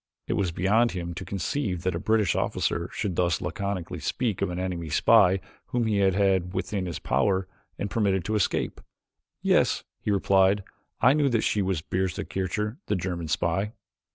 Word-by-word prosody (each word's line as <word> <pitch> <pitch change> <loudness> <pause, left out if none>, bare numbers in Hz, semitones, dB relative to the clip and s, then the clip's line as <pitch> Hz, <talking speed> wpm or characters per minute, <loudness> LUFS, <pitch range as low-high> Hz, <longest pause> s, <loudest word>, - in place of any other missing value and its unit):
It - - -1
was 95 -4 0
beyond 105 +8 +2
him 85 -1 -4
to - - -6
conceive 95 - -2
that 95 -1 0
a 85 - -2
British 110 -3 +2
officer 85 +2 -1
should 95 -5 -2
thus 85 -2 +1
laconically 90 -1 -3
speak 105 - -1
of - - +1
an 90 - -4
enemy 90 -3 -3
spy 95 +3 +5 0.3
whom 120 -1 0
he 110 -2 +1
had 95 -2 +3
had 95 -2 +1
within 95 -3 -2
his 85 - -4
power 95 +8 +1 0.3
and 100 - -2
permitted 100 -4 0
to 110 - -1
escape. 105 -5 0 0.6
"Yes," - - +3 0.2
he - - -4
replied, 100 0 +3 0.4
"I 125 +4 +6
knew 145 -2 +3
that 115 -3 +2
she 105 - +1
was 95 -4 0
Bertha 95 0 -2
Kircher, 105 - -2
the 105 - +1
German 85 -2 -3
spy?" 95 +7 0
95 Hz, 180 wpm, -26 LUFS, 90-105 Hz, 0.6 s, I